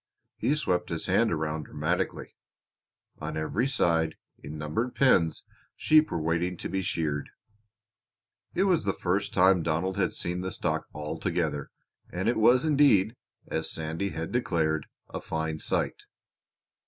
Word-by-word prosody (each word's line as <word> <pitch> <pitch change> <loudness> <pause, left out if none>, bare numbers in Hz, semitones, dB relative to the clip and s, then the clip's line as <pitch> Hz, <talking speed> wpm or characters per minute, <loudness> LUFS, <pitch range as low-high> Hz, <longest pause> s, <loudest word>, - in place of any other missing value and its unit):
He 145 - +1
swept 90 -12 0
his 80 -1 -2
hand 105 +5 +3
around 80 -1 -2
dramatically. - - -2 0.8
On 80 0 -4
every 100 +11 0
side, 80 -11 +1 0.2
in 75 +2 -8
numbered 80 +12 -2
pens, 90 - +3 0.3
sheep 155 0 +4
were 85 - -2
waiting 85 +3 0
to - - -4
be 95 - -1
sheared. 75 -5 -2 1.3
It 190 - +3
was 185 -4 +3
the 100 -2 +1
first 100 +3 -1
time 95 -1 +5
Donald 85 +4 -1
had 100 - +1
seen 90 +1 -2
the 95 - -2
stock - - -2
all 75 0 -5
together 80 -6 -1 0.4
and 95 +4 -2
it 120 - +2
was 125 +5 +5
indeed, 135 -8 +4 0.3
as 80 - -2
Sandy 80 +5 -3
had 80 -1 -4
declared, 80 -11 0 0.2
a - - -6
fine 80 0 -3
sight. - - -1
90 Hz, 145 wpm, -28 LUFS, 80-105 Hz, 1.3 s, time